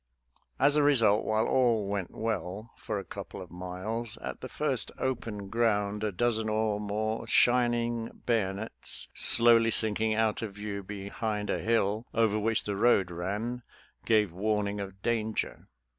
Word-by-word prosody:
As 140 +2 +4
a 150 - +4
result, 115 -8 +4
while 110 0 +1
all 120 -5 +2
went 100 -3 -2
well 110 0 -4
for - - -4
a 100 - -4
couple 100 -3 -8
of 90 -2 -10
miles, 95 +6 -4
at - - -7
the - - -6
first - - -2
open 115 -6 -3
ground 105 -2 0
a 105 - 0
dozen 110 +2 0
or 110 -1 0
more 110 +2 -2
shining 120 -1 +2 0.2
bayonets 110 -2 0
slowly 115 -1 +5
sinking 110 0 +1
out 110 0 +1
of 105 -3 -5
view 105 -1 -5
be 100 0 -7
hind 105 -1 -2
a - - -1
hill 110 0 0
over 110 -2 +2
which 115 +1 +1
the 105 - -3
road 100 -4 +3
ran, 105 +8 -3 0.4
gave 105 -6 +2
warn 105 +2 0
ing 100 0 -4
of 95 -1 -7
danger. 110 -2 -2
110 Hz, 160 wpm, -29 LUFS, 100-115 Hz, 0.4 s, slowly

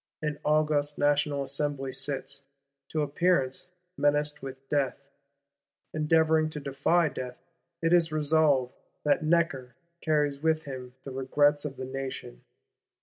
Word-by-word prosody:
An 150 -1 -3
august 150 -1 +1
National 145 -1 +2
Assembly 140 0 -2
sits, 140 +1 -3 0.5
to 155 -1 0
appearance, 145 -2 +1 0.3
menaced 145 +1 +1
with 135 0 -9
death; 140 -3 0 1.0
endeavouring 155 0 +3
to 155 - -6
defy 140 +5 +2
death. 125 -3 -6 0.5
It 165 - +2
has 170 -2 +4
resolved 150 -4 +2 0.3
"that 150 +1 +2
Necker 155 -7 +1 0.3
carries 145 -3 +1
with 160 0 +1
him 130 -2 -8
the 135 - -7
regrets 145 +3 +2
of 140 -2 -5
the 130 - -4
Nation." 130 - -6
145 Hz, 125 wpm, -28 LUFS, 135-155 Hz, 1.0 s, has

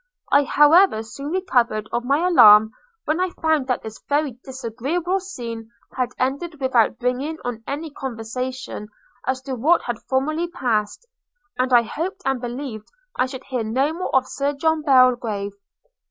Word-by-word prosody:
I 285 0 +5
however 295 - +5
soon 250 +6 -8
recovered 245 - 0
of 240 - -1
my 290 +7 +2
alarm, 215 -10 +7 0.3
when 310 +3 0
I 370 0 +1
found 315 -4 +1
that 250 - -1
this 220 0 -9
very 285 -4 0
disagreeable 270 - -2
scene 235 - -7 0.3
had 250 -1 -1
ended 285 +5 -2
without 250 -4 +2
bringing 255 +6 -2
on 235 -2 -4
any 300 +2 -4
conversation 255 -2 -5 0.4
as 260 0 -1
to 270 - -5
what 305 +8 +2
had 240 -3 -4
formerly 310 +6 0
passed; 240 - -2 0.5
and 255 +1 +1
I 240 -1 +6
hoped 370 - -5
and 270 -2 0
believed 245 -3 -6 0.3
I 260 - +1
should 260 -1 -8
hear 255 -4 -3
no 265 +8 0
more 355 -2 -3
of 260 -1 +3
Sir 280 +2 -1
John 320 +2 0
Belgrave. 245 -8 +3
260 Hz, 155 wpm, -22 LUFS, 235-305 Hz, 0.5 s, alarm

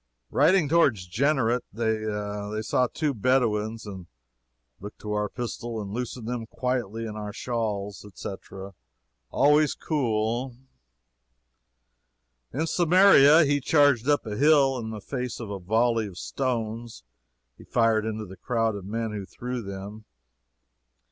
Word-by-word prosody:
Riding 185 -4 +4
toward 160 -5 +4
Genessaret, 120 - 0
they 105 -1 -2
saw 125 +3 +1
two 150 +3 -1
Bedouins, 115 -2 0
and 95 -4 -8 0.7
"we - - -11
looked - - -13
to 105 -1 -4
our 105 -1 -1
pistols 120 -1 -5
and 100 0 -7
loosened 125 -1 -5
them 120 -2 -4
quietly 115 -3 -2
in 105 -1 -6
our 105 -1 -5
shawls," 105 -3 -3
etc. 95 -1 -8 0.6
Always 150 +1 +3
cool. 120 -3 -1 2.0
In 155 +6 -1
Samaria, 170 -3 +6
he 145 0 +1
charged 145 -3 +3
up 145 -3 +2
a 105 -2 -4
hill, 140 -3 +4
in 110 -1 -5
the 110 -2 -6
face 125 +2 -4
of 110 -4 -6
a 100 - -4
volley 110 +4 +1
of 90 -3 -11
stones; 115 - -3 0.5
he - - -15
fired 115 -2 +2
into 110 -1 -4
the 95 0 -11
crowd 115 -3 0
of 100 -2 -7
men 115 +1 -2
who 100 -3 -6
threw 125 +2 -5
them. 100 +1 -8
115 Hz, 135 wpm, -26 LUFS, 105-130 Hz, 2.0 s, Samaria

